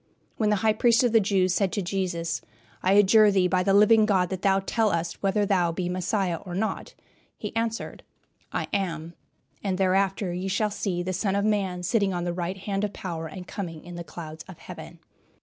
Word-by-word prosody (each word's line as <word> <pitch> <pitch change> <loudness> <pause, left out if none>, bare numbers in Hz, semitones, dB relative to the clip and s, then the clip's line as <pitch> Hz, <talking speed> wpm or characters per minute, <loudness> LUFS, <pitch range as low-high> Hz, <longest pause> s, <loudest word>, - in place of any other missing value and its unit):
When 215 -2 +1
the 210 - +3
High 215 - +5
Priest 235 +1 +4
of 245 - +3
the 225 - +6
Jews 190 -3 +2
said 190 -1 +1
to 205 - 0
Jesus, 175 -3 -2 0.4
"I 185 - +3
adjure 205 +1 +6
thee 190 -2 +3
by 185 0 +1
the 195 - +1
living 210 +2 +6
God 185 -4 +2
that 190 -1 -4
thou 195 -1 +3
tell 220 +3 +1
us 170 -2 -1
whether 205 +1 +1
thou 180 -4 +2
be 175 +1 -3
Messiah 185 0 -1
or 175 +1 -8
not," 215 +3 -3 0.4
he - - -6
answered, 225 0 -2 0.5
"I - - -2
am; 170 -4 -2 0.5
and 190 -2 -1
hereafter 190 0 +1
ye 180 +2 -3
shall 210 +2 0
see 185 -4 -2
the 185 +1 -3
Son 195 +1 0
of 200 +1 +1
man 195 -4 0
sitting 195 0 +1
on 175 - -2
the 175 0 -2
right 175 +2 -3
hand 195 +1 -3
of 205 -1 -2
power 165 -3 -5
and 180 +3 -8
coming 165 -5 -6
in 175 - -9
the 170 0 -6
clouds 160 -2 -9
of 185 -3 -11
heaven." - - -10
190 Hz, 210 wpm, -26 LUFS, 175-205 Hz, 0.5 s, the